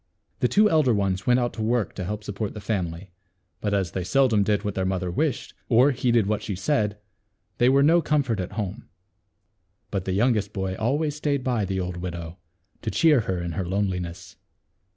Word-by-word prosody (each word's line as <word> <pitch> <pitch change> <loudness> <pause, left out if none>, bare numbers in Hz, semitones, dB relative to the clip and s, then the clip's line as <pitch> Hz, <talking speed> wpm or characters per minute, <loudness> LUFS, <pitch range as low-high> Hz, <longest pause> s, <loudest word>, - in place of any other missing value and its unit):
The - - +3
two 210 +1 +4
elder 155 - +3
ones 95 -2 -1
went 125 0 +5
out 120 -1 -1
to 110 - -6
work 115 0 0
to 95 - -5
help 105 +3 -4
support 100 +1 -4
the - - -5
family, 90 -3 -3 0.5
but 105 - -2
as 95 -4 0
they 95 - -3
seldom 120 +1 +3
did 105 0 +1
what 105 - -2
their 95 - -1
mother 95 -1 -1
wished, 140 - -1 0.2
or 125 +4 +5
heeded 120 -4 +2
what 105 +1 -1
she 100 - -4
said, 105 0 0 0.6
they 120 - +5
were 135 +1 +4
no 165 +4 +5
comfort 140 -9 0
at 90 - -4
home. 100 -2 -5 1.0
But 95 -2 -2
the 95 - -1
youngest 105 -1 +1
boy 95 -2 -2
always 145 +8 0
staid 145 -3 -1
by 120 -5 0
the 95 0 -2
old 90 -1 -3
widow, 85 -1 -6 0.4
to 110 - -2
cheer 155 +2 +4
her 95 -5 -2
in 85 - -3
her 95 +4 -2
loneliness. 90 -3 -3
105 Hz, 195 wpm, -25 LUFS, 95-125 Hz, 1.0 s, went